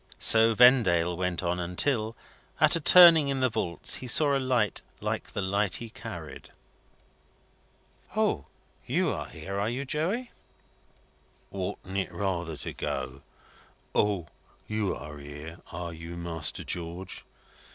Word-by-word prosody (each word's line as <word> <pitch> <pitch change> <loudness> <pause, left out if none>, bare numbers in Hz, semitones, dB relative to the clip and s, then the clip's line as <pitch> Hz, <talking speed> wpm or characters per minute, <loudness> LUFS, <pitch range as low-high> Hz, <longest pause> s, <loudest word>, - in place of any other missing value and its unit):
So 115 0 +5
Vendale 105 -9 +5
went 90 0 -2
on 90 0 -1
until, 110 +6 -1 0.4
at 155 +1 +5
a - - +1
turning 165 -2 +9
in 135 -1 -1
the 130 -2 +2
vaults, 85 -6 -1
he 130 - -8
saw 140 +3 +4
a - - +2
light 125 -7 +1 0.2
like - - -3
the - - -3
light 100 0 0
he 115 -2 -6
carried. - - -9 1.7
"O! - - 0 0.4
You - - +1
are - - -4
here, 100 +1 -6
are 105 +2 0
you, 130 +4 -3
Joey?" 180 - -2 1.2
"Oughtn't 95 0 -5
it 95 - -3
rather 85 -3 -3
to 70 - -5
go, 65 0 -4 0.7
'O! 100 -5 +1 0.4
You're 100 -8 -3
here, 75 +4 -9
are 85 0 -5
you, 85 +1 -8
Master 80 -3 -3
George?' 85 +2 -5
95 Hz, 130 wpm, -28 LUFS, 85-125 Hz, 1.7 s, turning